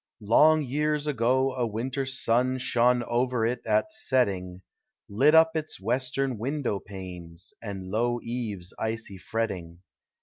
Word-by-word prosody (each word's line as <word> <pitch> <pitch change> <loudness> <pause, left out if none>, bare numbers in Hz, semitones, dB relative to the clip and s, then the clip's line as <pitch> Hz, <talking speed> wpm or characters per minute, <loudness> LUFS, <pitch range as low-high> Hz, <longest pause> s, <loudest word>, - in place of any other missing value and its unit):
Long 155 +9 +5
years 150 +3 -1
ago 130 -1 +1
a 125 -2 -1
winter 130 +5 -3
sun 130 0 +1
Shone 125 -1 +2
over 120 0 0
it 120 +1 -2
at 110 - +1
setting; 95 - 0 0.4
Lit 140 +10 +4
up 160 0 +6
its 155 -1 -3
western 125 +3 -1
window 130 -4 -2
panes, 90 -4 -10
And 100 -4 -6
low 120 +3 0
eaves' 110 -7 -4
icy 110 -3 -3
fretting. 90 -2 -4
120 Hz, 130 wpm, -27 LUFS, 100-130 Hz, 0.4 s, up